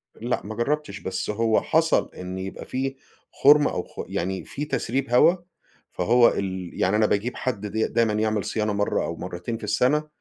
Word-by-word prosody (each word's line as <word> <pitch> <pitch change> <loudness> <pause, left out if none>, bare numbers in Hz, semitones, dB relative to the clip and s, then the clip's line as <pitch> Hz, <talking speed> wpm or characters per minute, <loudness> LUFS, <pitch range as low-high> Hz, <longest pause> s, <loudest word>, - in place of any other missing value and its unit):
لأ، 120 +2 -2
ما 110 +2 -6
جربتش 140 -3 -2
بس 95 +1 -4
هو 110 +1 +2
حصل 160 +1 +2
إن 90 +1 -6
يبقى 95 +1 -6
في 135 +1 -3 0.4
خرم 145 +1 +5
أو - - -2
خ - - -8
يعني 95 +2 -3
في 145 - -5
تسريب 135 -1 -2
هوا، 125 +9 +5 0.6
فهو 120 +6 +4
ال 95 -2 -3
يعني 95 +3 +3
أنا 110 0 +4
باجيب 105 +4 0
حد 110 -5 -3
د 110 +2 -1
دايمًا 115 -2 +2
يعمل 110 -1 0
صيانة 105 -1 -1
مرة 100 0 0
أو - - -3
مرتين 90 +7 -5
في 110 - -14
السنة، 125 +9 +1
110 Hz, 180 wpm, -24 LUFS, 100-130 Hz, 0.6 s, خرم